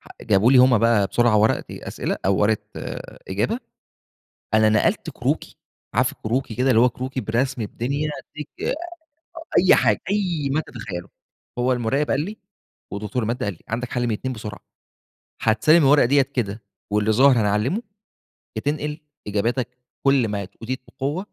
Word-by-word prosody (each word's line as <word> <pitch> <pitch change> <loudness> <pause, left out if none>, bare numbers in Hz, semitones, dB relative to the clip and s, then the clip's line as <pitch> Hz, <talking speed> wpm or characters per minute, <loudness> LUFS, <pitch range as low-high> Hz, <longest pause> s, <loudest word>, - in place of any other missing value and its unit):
ح - - -18
جابوا 110 +5 +4
لي 130 - +7
هم 125 -3 +6
بقى 115 -3 +3
بسرعة 120 +1 +3
ورقة 105 +1 +3
أسئلة - - -4
أو 95 - +3
ورقة 105 0 +2 0.7
إجابة، 105 - -1 1.0
أنا 110 0 +5
نقلت 110 -1 +1
كروكي، - - -2 0.4
عارف - - +2
الكروكي، 115 0 -3
كده 130 +3 +2
اللي 115 - +5
هو 125 - +6
كروكي، 130 +2 -4
برسم 120 +3 -1
الدنيا 140 +8 -2
أدِّيك 150 -1 -9 0.2
أ - - 0 0.8
أي 185 +1 +6
حاجة، 110 -6 +3
أي 175 -9 0
ما 155 - +2
تتخيّله. 100 - -7 0.5
هو 125 +1 +2
المُراقب 125 +4 0
قال 140 - +2
لي 205 +7 -5 0.5
ودكتور 105 +4 -3
المادة 115 0 -2
قال 100 - -2
لي: - - -24
"عندك 120 +2 -3
حَل 120 -1 0
من 115 - 0
2 130 +5 -3
بسرعة، 105 -2 -7 0.8
هتسلم 115 +9 +4
الورقة 140 -2 +5
ديّة 140 +2 +4
كده 115 -6 -3 0.3
واللي 105 +1 +2
ظاهر 135 +5 +6
هنعلّمه، 105 - +1 0.7
يا - - -3
تنقل 150 +1 -2 0.3
إجاباتك 120 +4 -1 0.2
بكل 135 -4 +3
ما 100 -2 -3
ت 100 - -21
أوتيت 130 +3 -4
بقوة." 140 +6 -3
120 Hz, 160 wpm, -23 LUFS, 110-135 Hz, 1.0 s, لي